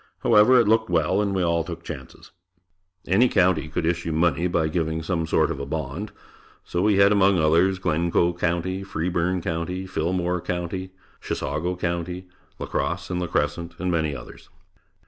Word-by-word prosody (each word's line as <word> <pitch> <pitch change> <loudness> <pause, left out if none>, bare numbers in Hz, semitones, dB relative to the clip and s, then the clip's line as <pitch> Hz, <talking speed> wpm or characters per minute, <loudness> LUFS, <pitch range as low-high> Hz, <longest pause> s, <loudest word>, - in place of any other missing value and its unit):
However, 115 +5 +6
it 115 - +3
looked 110 -1 +3
well 90 +3 +2
and 100 -2 -1
we 95 - +1
all 85 -1 +1
took 85 0 -8
chances. 70 -6 -9 0.7
Any 115 +7 +4
county 90 -5 +2
could 80 +2 -2
issue 85 0 -1
money 85 +1 +1
by 85 -2 +1
giving 80 0 -2
some 80 -1 -1
sort 80 0 +2
of 75 - -4
a 70 - -4
bond, 70 -2 -4 0.5
so 85 - -2
we 105 0 +3
had 100 +1 +6
among 100 -2 +4
others 85 +4 +3
"Glencoe 85 0 +1
County," 85 +2 -1
"Freeborn 90 0 -1
County", 90 +3 -3
"Fillmore 90 0 -1
County," 90 +2 -4 0.3
"Chisago 80 +6 -2
County," 90 +1 -3 0.3
"La - - -5
Crosse 85 +1 -3
and 90 0 -1
La 90 - -2
Crescent," 85 0 -2
and 90 0 -2
many 80 -4 0
others. - - -11
85 Hz, 165 wpm, -24 LUFS, 80-95 Hz, 0.7 s, However